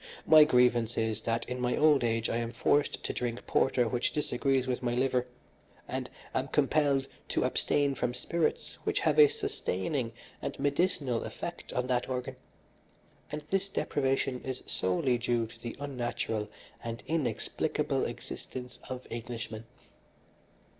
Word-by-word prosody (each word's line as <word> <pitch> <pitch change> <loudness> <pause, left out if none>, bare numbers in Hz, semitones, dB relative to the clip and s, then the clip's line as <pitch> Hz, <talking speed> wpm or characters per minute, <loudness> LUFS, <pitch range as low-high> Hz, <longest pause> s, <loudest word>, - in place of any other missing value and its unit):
My 155 -1 +9
grievance 125 -4 +3
is, 110 -1 0
that 115 +1 -1
in 125 0 -3
my 125 0 +1
old 150 -4 +5
age 115 -1 +1
I - - 0
am 115 -1 -1
forced 145 +4 +1
to - - -2
drink 120 -1 -3
porter 125 -2 +3
which 120 +1 0
disagrees 135 -2 +1
with 125 -1 -1
my 120 -1 0
liver, 125 -1 +1 0.6
and - - -3 0.2
am - - 0
compelled 140 -3 +2 0.2
to - - +1
abstain 140 -1 +2
from 125 -1 -1
spirits 165 +6 -1
which - - 0
have - - +3
a 445 - +10
sustaining 405 - -2 0.3
and - - -4
medicinal 140 -5 +1
effect - - -6
on 125 - 0
that 125 -1 0
organ, 130 +1 -3 1.0
and 150 0 -4
this 195 +1 +1
deprivation 135 -6 0
is 130 -1 -4
solely 120 +7 +1
due 120 -1 +1
to 115 +1 -13
the 120 0 -6
unnatural 120 -5 -2 0.3
and 115 0 -5
inexplicable 135 -6 0
existence 125 -1 -7
of 130 0 -5
Englishmen. 115 -1 -5
125 Hz, 145 wpm, -31 LUFS, 120-140 Hz, 1.0 s, a